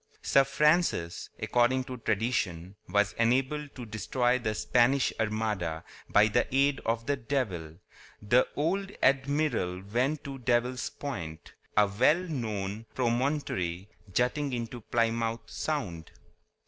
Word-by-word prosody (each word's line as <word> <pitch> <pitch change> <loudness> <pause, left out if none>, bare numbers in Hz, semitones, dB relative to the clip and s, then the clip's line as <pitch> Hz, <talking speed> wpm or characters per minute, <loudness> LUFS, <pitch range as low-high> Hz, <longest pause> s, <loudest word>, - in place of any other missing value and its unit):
Sir 135 - +5
Francis, 150 - +1
according 125 +2 +2
to 130 0 -7
tradition, 100 -6 -1
was 105 +1 +2
enabled 135 +5 +1
to 125 - -7
destroy 120 +3 0
the 110 -3 -2
Spanish 120 +5 +3
Armada 105 -7 -1 0.3
by 105 +1 +5
the 120 +3 +1
aid 135 +1 +3
of 115 0 0
the 145 - +1
devil. 110 - -3 0.4
The 120 +5 +3
old 190 +6 0
admiral 130 -9 +1
went 125 +9 0
to 135 -2 -7
Devil's 125 0 0
Point, 85 - -7 0.2
a 105 - +7
well 120 +11 +3
known 110 - -4
promontory 120 - -1 0.2
jutting 130 +6 0
into 120 0 -4
Plymouth 115 0 0
Sound. 100 - -3
120 Hz, 120 wpm, -29 LUFS, 105-135 Hz, 0.4 s, a